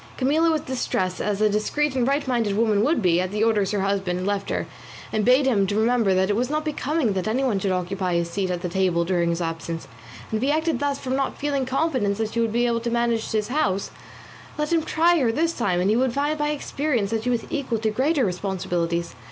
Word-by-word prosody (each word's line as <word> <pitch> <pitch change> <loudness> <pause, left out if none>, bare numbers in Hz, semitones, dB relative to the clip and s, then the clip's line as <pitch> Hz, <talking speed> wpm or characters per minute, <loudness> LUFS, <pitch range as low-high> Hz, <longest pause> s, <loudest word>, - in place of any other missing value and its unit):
Camilla 305 +5 +2
was 315 -2 +1
distressed, 190 -8 -2
as 210 0 -1
a 215 - +5
discreet 260 +7 0
and 250 -1 +1
right 280 +1 0
minded 230 -5 0
woman 215 -2 +2
would 290 -4 +1
be, 175 -1 +3
at 185 - -2
the 210 +2 -1
orders 210 -4 +2
her 205 -1 -1
husband 190 -2 -1
left 200 0 -1
her, - - -1 0.5
and 215 - +1
bade 255 +5 +4
him 205 -7 +2
remember 220 -1 +2
that 190 0 +2
it 205 - +1
was 245 +3 0
not 305 +1 -1
becoming 300 -5 0
that 185 0 -2
anyone 240 -2 +1
should 190 0 -1
occupy 185 0 -1
his 170 0 +1
seat 185 +2 -2
at 180 0 -3
the - - 0
table 175 -1 +1
during 175 -1 +1
his 170 +1 -1
absence, 165 0 -4 0.4
and 220 - 0
if - - -6
he 270 +3 +2
acted 315 +1 0
thus 285 -1 0
from 260 -1 -3
not 275 0 -1
feeling 280 -3 -1
confidence 260 -8 0
that 220 -1 -2
she 235 - -1
would 230 -1 +1
be 240 +2 +1
able 235 -1 +1
to 235 +1 -3
manage 235 -1 0
his 215 0 -1
house, 200 -9 0 0.7
let 300 +2 -1
him 330 - +3
try 335 +2 +3
her 245 -5 +2
this 325 +7 0
time, 195 - 0
and 190 +3 +2
he - - +3
would 255 0 +1
find 290 +3 -1
by 295 0 +1
experience 280 -7 -1
that 225 -1 0
she 250 - -2
was 240 -2 0
equal 265 -5 -1
to 220 0 -1
greater 270 +4 +1
responsibilities. 175 -3 -2
225 Hz, 240 wpm, -24 LUFS, 195-270 Hz, 0.7 s, a